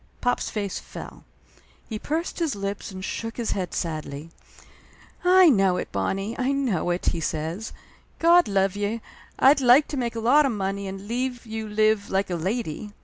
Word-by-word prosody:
Pop's 245 - 0
face 200 -3 -3
fell. - - -10 0.6
He 220 -2 -5
pursed 325 +9 -3
his 325 -7 0
lips 200 0 -4
and 190 0 -6
shook 225 +1 -5
his 235 -2 -2
head 185 -2 -2
sadly. 155 -2 -4 0.9
"I 365 0 +7
know 195 - +4
it, - - -4
Bonnie, 195 +4 -2
I 260 +2 +1
know 245 - 0
it!" 175 +1 -1
he 170 - -3
said. 165 +6 -3 0.5
"God 345 +1 +5
love 195 -1 +1
ye, 205 +3 -2 0.4
I'd 275 +2 +5
like 255 +4 +6
to 290 - -3
make 235 -2 -2
a - - -2
lot 275 +6 +5
of 255 - -1
money 200 -1 -3
and 195 +1 -7
leave 245 +1 -2
you 220 -1 -5
live 215 -1 +2
like 195 0 0
a - - 0
lady. 205 +2 -3
215 Hz, 180 wpm, -25 LUFS, 195-250 Hz, 0.9 s, I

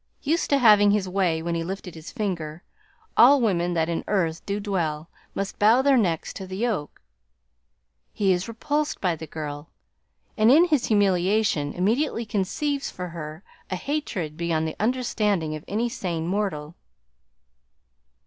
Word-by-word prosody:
"Used 320 +4 0
to 280 - +4
having 210 -5 +6
his 200 -2 +1
way 180 -4 0
when 170 0 -2
he 165 0 -1
lifted 185 0 -6
his 160 -1 -10
finger, 175 -8 -4 0.5
all 275 +4 +7
women 175 -7 +1
that 160 -1 +1
in 170 -1 -2
earth 170 -5 0
do 200 +1 -1
dwell 170 -6 -2 0.2
must 195 0 -4
bow 225 +5 +5
their 280 -1 +5
necks 175 -10 0
to 190 - -7
the 185 0 -6
yoke. 215 -9 -3 1.1
He 195 -2 +1
is 180 +1 -2
repulsed 290 +7 -2
by 180 -3 0
the 160 0 -9
girl 150 0 -6 0.7
and 215 +1 +4
in 320 +6 +7
his 300 -7 +1
humiliation 195 -6 +2
immediately 230 +6 0
conceives 270 +8 -2
for 180 -1 -6
her 160 +1 -8 0.3
a 185 - -2
hatred 185 - -3
beyond 165 -2 0
the 160 - -5
understanding 210 -8 0
of 155 - -8
any 225 +4 0
sane 180 -9 -3
mortal." 175 -5 -2
190 Hz, 155 wpm, -25 LUFS, 165-225 Hz, 1.1 s, all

